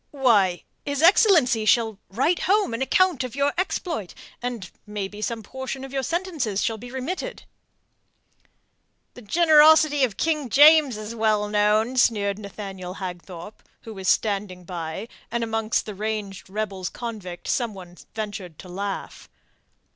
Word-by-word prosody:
"Why 210 Hz, -, +2 dB, 0.2 s
his 285 Hz, +1 st, -2 dB
excellency 330 Hz, -, +5 dB
shall 220 Hz, -2 st, +2 dB
write 270 Hz, -, +1 dB
home 405 Hz, -, +3 dB
an 230 Hz, -, -3 dB
account 340 Hz, 0 st, +2 dB
of 255 Hz, -1 st, -6 dB
your 280 Hz, 0 st, +1 dB
exploit, 335 Hz, -, -3 dB, 0.3 s
and 240 Hz, -7 st, -5 dB, 0.2 s
maybe 210 Hz, 0 st, -5 dB
some 225 Hz, 0 st, -3 dB
portion 265 Hz, +3 st, -6 dB
of 270 Hz, 0 st, -9 dB
your 270 Hz, -, 0 dB
sentences 315 Hz, -, -2 dB
shall 225 Hz, -1 st, -1 dB
be 245 Hz, +3 st, -9 dB
remitted." 335 Hz, -, -5 dB, 1.7 s
"The 245 Hz, -, -12 dB
generosity 310 Hz, +2 st, +5 dB
of 220 Hz, -7 st, 0 dB
King 305 Hz, -5 st, 0 dB
James 290 Hz, -2 st, +6 dB
is 215 Hz, +1 st, -6 dB
well 215 Hz, -2 st, +1 dB
known," 210 Hz, +4 st, +2 dB
sneered 205 Hz, -4 st, +2 dB
Nathaniel 195 Hz, -3 st, -7 dB
Hagthorpe, 180 Hz, +1 st, -8 dB, 0.2 s
who 225 Hz, -, -9 dB
was 190 Hz, -2 st, -6 dB
standing 200 Hz, -4 st, 0 dB
by, 170 Hz, +3 st, -5 dB, 0.2 s
and 235 Hz, 0 st, -2 dB
amongst 225 Hz, -1 st, -1 dB
the 210 Hz, -, -6 dB
ranged 205 Hz, -2 st, -4 dB
rebels 195 Hz, -3 st, -3 dB
convict 210 Hz, -7 st, -7 dB
some 235 Hz, -5 st, -1 dB
one 180 Hz, -2 st, -11 dB, 0.2 s
ventured 205 Hz, -7 st, -6 dB
to 185 Hz, -, -12 dB
laugh. 195 Hz, +2 st, -5 dB
220 Hz, 140 wpm, -24 LUFS, 200-270 Hz, 1.7 s, James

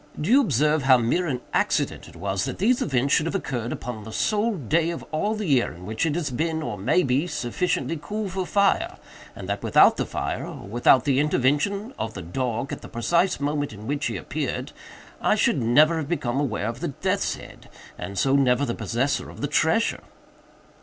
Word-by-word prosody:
Do 160 Hz, +8 st, -1 dB
you 275 Hz, +3 st, +7 dB
observe 150 Hz, -, +2 dB
how 130 Hz, -1 st, +6 dB
mere 125 Hz, +10 st, 0 dB
an 125 Hz, -5 st, -2 dB
accident -, -, 0 dB
it -, -, -14 dB
was 95 Hz, +2 st, -2 dB
that -, -, -4 dB
these 240 Hz, +6 st, +2 dB
events 135 Hz, 0 st, +1 dB
should 160 Hz, -, +3 dB
have 165 Hz, -, -3 dB
occurred 120 Hz, -, -3 dB
upon 115 Hz, -3 st, -5 dB
the 110 Hz, -, -9 dB
sole 215 Hz, -, 0 dB
day 160 Hz, -, +1 dB
of 170 Hz, -, -5 dB
all 205 Hz, +8 st, 0 dB
the 215 Hz, -1 st, -3 dB
year 135 Hz, -7 st, +2 dB
in 90 Hz, +2 st, -11 dB
which 110 Hz, -, -1 dB
it 150 Hz, -, -1 dB
has 165 Hz, -5 st, -2 dB
been, 160 Hz, +4 st, -1 dB
or 120 Hz, -7 st, -3 dB
may 105 Hz, -, +2 dB
be, 135 Hz, +6 st, +1 dB
sufficiently 165 Hz, +3 st, -2 dB
cool 210 Hz, +5 st, -3 dB
for 185 Hz, -1 st, -3 dB
fire, 200 Hz, -1 st, +2 dB, 0.4 s
and 95 Hz, -, -8 dB
that 100 Hz, 0 st, -2 dB
without -, -, +5 dB
the -, -, 0 dB
fire, -, -, -3 dB
or -, -, -8 dB
without 120 Hz, +3 st, +4 dB
the 135 Hz, -2 st, +2 dB
intervention 150 Hz, -, +1 dB
of 110 Hz, -, -4 dB
the 95 Hz, -, -6 dB
dog 120 Hz, +7 st, -3 dB
at -, -, -6 dB
the -, -, -10 dB
precise 170 Hz, +10 st, +1 dB
moment 145 Hz, -2 st, -1 dB
in 105 Hz, 0 st, -10 dB
which 145 Hz, +3 st, -1 dB
he -, -, -3 dB
appeared, -, -, -4 dB, 0.5 s
I -, -, +3 dB
should -, -, +2 dB
never 150 Hz, +8 st, +4 dB
have 155 Hz, -2 st, -4 dB
become 135 Hz, -7 st, -1 dB
aware 120 Hz, -8 st, -1 dB
of 115 Hz, +1 st, -4 dB
the -, -, -2 dB
death's 135 Hz, -, -1 dB
head, -, -, -13 dB, 0.3 s
and 100 Hz, 0 st, -7 dB
so 135 Hz, 0 st, +3 dB
never 135 Hz, 0 st, +3 dB
the 120 Hz, -, -2 dB
possessor 130 Hz, +6 st, -1 dB
of -, -, -11 dB
the 145 Hz, -, 0 dB
treasure?" 160 Hz, +9 st, +1 dB
140 Hz, 210 wpm, -24 LUFS, 120-170 Hz, 0.5 s, you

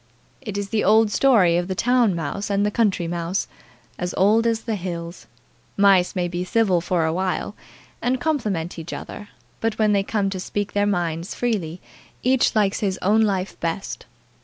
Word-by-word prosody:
"It's 205 Hz, -2 st, -4 dB
the 215 Hz, 0 st, 0 dB
old 215 Hz, +1 st, +4 dB
story 205 Hz, -10 st, +4 dB
of 175 Hz, 0 st, -1 dB
the 190 Hz, -, -3 dB
town 240 Hz, -3 st, +2 dB
mouse 170 Hz, +6 st, -4 dB
and 200 Hz, 0 st, +1 dB
the 210 Hz, -, 0 dB
country 200 Hz, -6 st, +1 dB
mouse, 170 Hz, +2 st, -2 dB, 0.5 s
as 180 Hz, 0 st, -3 dB
old 215 Hz, +4 st, +4 dB
as 225 Hz, -1 st, 0 dB
the 225 Hz, -, -3 dB
hills. 170 Hz, -3 st, -6 dB, 0.5 s
Mice 195 Hz, -2 st, +4 dB
may 180 Hz, -1 st, 0 dB
be 175 Hz, +1 st, -3 dB
civil 190 Hz, -3 st, +2 dB
for 170 Hz, -1 st, 0 dB
a 160 Hz, -, 0 dB
while, 190 Hz, +3 st, -2 dB, 0.5 s
and 250 Hz, +2 st, 0 dB
compliment 210 Hz, -, -2 dB
each 165 Hz, +1 st, -7 dB
other; 205 Hz, -, -8 dB, 0.3 s
but 225 Hz, -1 st, -1 dB
when 215 Hz, -1 st, +3 dB
they 200 Hz, -, +3 dB
come 200 Hz, -1 st, -1 dB
to 190 Hz, -, -4 dB
speak 205 Hz, +2 st, -3 dB
their 205 Hz, 0 st, +2 dB
minds 175 Hz, -3 st, -2 dB
freely, 185 Hz, -8 st, -2 dB, 0.4 s
each 255 Hz, -1 st, +2 dB
likes 205 Hz, -2 st, +2 dB
his 195 Hz, -3 st, -1 dB
own 210 Hz, +4 st, +4 dB
life 195 Hz, -3 st, -1 dB
best." 170 Hz, +3 st, -4 dB
195 Hz, 180 wpm, -22 LUFS, 175-215 Hz, 0.5 s, old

